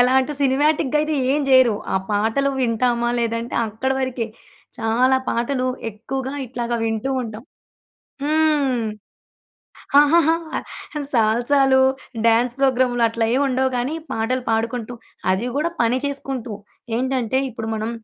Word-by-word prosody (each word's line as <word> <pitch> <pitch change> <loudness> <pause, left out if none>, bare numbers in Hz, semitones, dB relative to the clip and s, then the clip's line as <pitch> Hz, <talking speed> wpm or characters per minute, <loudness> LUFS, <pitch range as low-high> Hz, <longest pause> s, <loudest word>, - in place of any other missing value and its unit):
ఎలాంటి 260 +3 +3
సినిమాటిక్‌గా 295 +2 +2
అయితే 305 +1 -1 0.2
ఏం 295 - +1
జేయరు. 260 -4 +6 0.2
ఆ - - +4
పాటలు 225 +7 +1
వింటామా 240 0 +1
లేదంటే 230 0 -2
అక్కడి 240 +5 -2
వరకే. 255 -3 -2 0.5
చాలా 245 +4 +3
పాటలు 255 +2 0 0.2
ఎక్కువగా 260 +5 -5
ఇట్లాగా 240 -1 -3
వింటూ 225 +4 -2
ఉంటాం. 220 -1 -7 0.8
హ్మ్. 295 -5 +2 1.2
ఆహాహా! 320 +2 +5 0.8
సాల్సాలు 260 +4 +3 0.5
డ్యాన్స్ 235 +2 +3
ప్రోగ్రాములు 255 -3 +2
అట్లా 230 0 -1
ఏమి 265 - +2
ఉండవు 260 0 +1
కానీ 250 +5 -1 0.2
పాటలు 250 +3 -1
పాడుకుంటూ 230 +1 -1 0.4
అది 190 +5 0
కూడా 310 +4 +1
పని 235 +2 +2
చేసుకుంటూ. 270 -5 -4 0.4
ఏంటంటే 255 0 0
ఇప్పుడు 225 -1 -6
మనం 220 +1 -3
250 Hz, 115 wpm, -21 LUFS, 230-270 Hz, 1.2 s, జేయరు